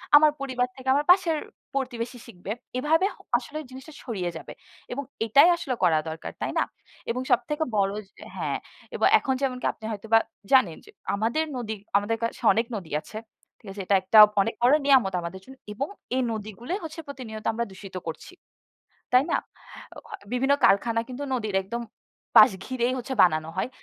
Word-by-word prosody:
আমার 300 +1 +7
পরিবার 255 -2 -1
থেকে 265 0 -12
আমার 290 +2 +1
পাশের 360 -4 +3 0.4
প্রতিবেশী 250 -2 -3
শিখবে। 190 -2 -8 0.3
এভাবে 315 +7 +2 0.3
আসলে 290 +5 -7
জিনিসটা 265 +4 -11
ছড়িয়ে 190 -8 -3
যাবে - - -9 0.4
এবং 280 +3 -3 0.2
এটাই 280 - +6
আসলে 320 -7 -3
করা 160 -3 +4
দরকার, 160 0 -6
তাই - - -1
না? - - +4 0.5
এবং 250 +2 -2
সবথেকে 300 +6 +1
বড় 195 0 +2 0.4
হ্যাঁ - - -1 0.4
এবং - - +3
এখন 265 - -1
যেমনকি 255 -2 -2
আপনি 220 - -12
হয়তোবা 220 +2 +2 0.3
জানেন 230 -12 +4
যে - - -17 0.3
আমাদের 230 +9 0
নদী 225 -3 -3 0.2
আমাদের 210 +3 -1
কাছে 230 - -3
অনেক 230 +2 +1
নদী 180 -6 -7
আছে। 215 - -10 0.4
ঠিক 215 - -17
আছে? 195 0 -6
এটা 200 - +3
একটা 205 +4 +3 0.2
অনেক 225 +4 -1
বড় 255 +4 +6
নিয়ামত 255 -9 +4
আমাদের 170 +2 -6
জন্য 265 - -13 0.2
এবং 270 +7 -3 0.3
এই 260 - +2
নদীগুলোই 220 - -5
হচ্ছে 320 0 -7
প্রতিনিয়ত 235 -6 -8
আমরা 235 +1 -1
দূষিত 190 0 -11
করছি। 165 - -7 0.8
তাই 255 - +6
না? - - +3 0.6
আ - - -11
অ - - -7 0.3
বিভিন্ন 270 +3 +2
কারখানা 230 +3 +3
কিন্তু 255 +3 -5
নদীর 215 -5 -2
একদম 235 +5 -5 0.6
পাশ 215 -1 +9
ঘিরেই 255 -1 -1
হচ্ছে 255 +2 -4
বানানো 155 -2 +2
হয়। - - -1
240 Hz, 170 wpm, -26 LUFS, 210-270 Hz, 0.8 s, পাশ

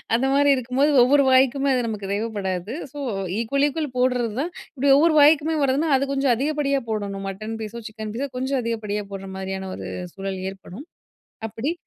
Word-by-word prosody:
அந்தமாரி 270 +4 +3
இருக்கும்போது 255 +4 +1
ஒவ்வொரு 280 +3 +4
வாய்க்குமே 270 +2 +4
அது 250 -2 0
நமக்கு 205 -3 -4
தேவைப்படாது. 200 -2 -3 0.2
So, - - -10 0.4
equal, 275 +5 +1
equal 295 -1 -3
போட்றதுதான். 250 +4 0 0.2
இப்பிடி 275 +1 +4
ஒவ்வொரு 315 +2 +4
வாய்க்குமே 310 +2 +4
வருதுனா, 280 +4 +1
அது 275 +1 -2
கொஞ்சம் 270 -2 +2
அதிகப்படியா 280 +1 0
போடணும், 200 -2 -3
மட்டன் 215 +3 -6
பீஸோ, 220 +2 -6
சிக்கன் 215 -1 -7
பீஸோ 275 +4 -3
கொஞ்சம் 260 +1 -1
அதிகப்படியா 215 -3 -2
போட்றமாரியான 190 0 -5
ஒரு 95 - -7 0.3
சூழல் 195 -1 -4
ஏற்படும். 195 - -11 0.6
அப்பிடி 240 +8 -3
250 Hz, 150 wpm, -23 LUFS, 210-280 Hz, 0.6 s, ஒவ்வொரு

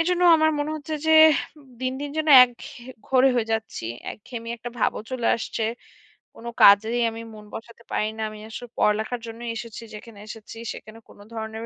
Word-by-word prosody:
এজন্য 355 +1 +1
আমার 315 0 +3
মনে 290 +1 -2
হচ্ছে 310 +1 -6
যে 320 - +4 0.7
দিন, 255 0 -1
দিন 290 0 -5
যেন 310 0 -1 0.2
একঘেয়ে 245 0 -11 0.2
ঘোরে 265 0 +4
হয়ে 225 -2 0
যাচ্ছি, 220 - -4 0.3
একঘেয়েমি 230 +2 -9
একটা 240 +1 -8
ভাবও - - 0
চলে 255 -2 -2
আসছে। 230 0 -4 0.7
কোন 230 - -13 0.2
কাজেই 220 +4 +6
আমি 225 0 -8
মন 210 -1 -12
বসাতে 230 +1 -10
পারি 215 - 0
না। 220 - -5
আমি 215 0 -11
আসলে 245 +2 -8
পড়ালেখার 220 +3 0
জন্য 230 +1 -9
এসেছি, 230 0 -7
যেখানে 210 0 -12
এসেছি 220 +1 -10 0.2
সেখানে 220 +1 -12
কোন - - -17 0.2
ধরনের 220 0 -6
230 Hz, 175 wpm, -24 LUFS, 220-255 Hz, 0.7 s, কাজেই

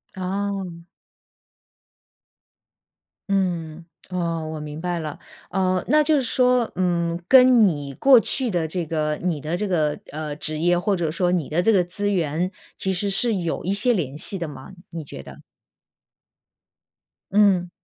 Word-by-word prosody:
哦。 190 -2 -4 2.5
嗯， 175 -4 -2 0.2
哦， 170 -3 -2
我 155 - -6
明 150 +1 -7
白 175 -1 -2
了。 155 -2 -6 0.3
呃， 185 -1 0
那 305 0 +4
就 310 +1 +2
是 280 - +2
说， 250 -1 +2
嗯， 170 -2 0
跟 255 -3 +7
你 145 -5 -3
过 270 - +6
去 245 +2 0
的 170 -3 -1
这 170 +2 -2
个 155 -1 -2
你 175 -4 -1
的 155 +4 -3
这 210 - -2
个， 155 -5 0
呃， 150 -1 -5
职 155 +1 -3
业， 175 +2 +2
或 195 +3 0
者 170 -3 -1
说 175 +3 0
你 170 -6 -1
的 160 +3 0
这 225 - +3
个 190 -4 +3
资 205 +3 -2
源， 170 0 -1 0.2
其 190 - -2
实 190 +2 0
是 220 +3 +2
有 170 -3 -3
一 185 - -1
些 220 +5 +3
联 150 - -3
系 195 +5 +4
的 170 - -4
吗？ 145 0 -10 0.2
你 165 -2 -6
觉 70 - -9
得？ - - -13 1.9
嗯。 195 -4 +3
180 Hz, 170 characters per minute, -22 LUFS, 160-200 Hz, 2.5 s, 跟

